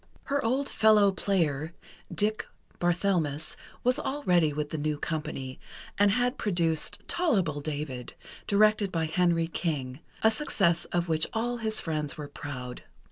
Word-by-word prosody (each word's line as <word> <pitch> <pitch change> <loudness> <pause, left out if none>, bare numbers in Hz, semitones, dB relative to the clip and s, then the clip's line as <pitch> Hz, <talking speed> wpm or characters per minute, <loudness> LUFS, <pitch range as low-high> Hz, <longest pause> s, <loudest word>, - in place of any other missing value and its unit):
Her 280 0 -1
old 260 +5 +1
fellow 215 -2 +5
player, 165 -6 0 0.4
"Dick" 215 +1 0 0.3
Barthelmess, 175 -4 0 0.3
was 250 +3 +2
already 180 - +2
with 150 0 -3
the 155 - -2
new 150 0 -1
company, 150 -4 -4 0.4
and 205 0 +4
had 245 +4 +1
produced 170 -6 0
"Tol'able 190 - +1
David," 145 -4 -5 0.3
directed 210 -1 +4
by 165 -2 0
Henry 165 0 +2
King, 145 -6 -3 0.2
a 220 - +6
success 195 - +1
of 175 0 -1
which 160 -1 +2
all 240 +2 -1
his 220 -2 -1
friends 155 -3 -2
were 150 -1 -5
proud. 125 -4 -7
170 Hz, 135 wpm, -28 LUFS, 150-215 Hz, 0.4 s, a